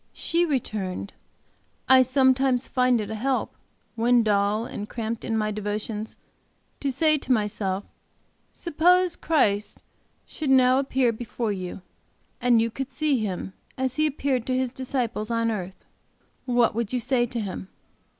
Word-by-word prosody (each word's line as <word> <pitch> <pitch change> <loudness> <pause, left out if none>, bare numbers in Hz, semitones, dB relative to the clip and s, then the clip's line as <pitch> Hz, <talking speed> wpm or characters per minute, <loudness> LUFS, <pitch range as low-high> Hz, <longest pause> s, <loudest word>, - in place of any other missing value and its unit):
She 340 +1 +1
returned, 210 - -3 0.7
'I 260 0 +7
sometimes 260 0 +3
find 250 -2 +2
it 210 0 -4
a - - -2
help, 255 +4 -1 0.4
when 235 +1 +3
dull 210 +1 +1
and 210 -3 -6
cramped 230 -1 -4
in 225 -2 -1
my 215 -1 0
devotions, 210 +1 -4 0.6
to 275 - -1
say 305 +3 +3
to 265 - -4
myself: 205 -4 0 0.7
Suppose 355 +2 +2
Christ 215 - 0 0.4
should 305 -3 -4
now 260 0 +5
appear 265 -3 +1
before 230 0 -3
you, 185 -1 -6 0.6
and 245 -2 +4
you 230 0 +1
could 270 +3 -5
see 300 -4 +1
Him 190 -2 -4 0.2
as 260 -1 -1
He 310 0 +3
appeared 265 -4 -1
to 255 -1 +1
His 255 -1 -1
disciples 250 -5 -2
on 230 -1 +1
earth, 190 -3 -6 0.6
what 245 -2 +3
would 230 -1 -2
you 250 - 0
say 240 0 +1
to 240 0 -4
Him? 190 -3 -5
240 Hz, 150 wpm, -25 LUFS, 215-265 Hz, 0.7 s, I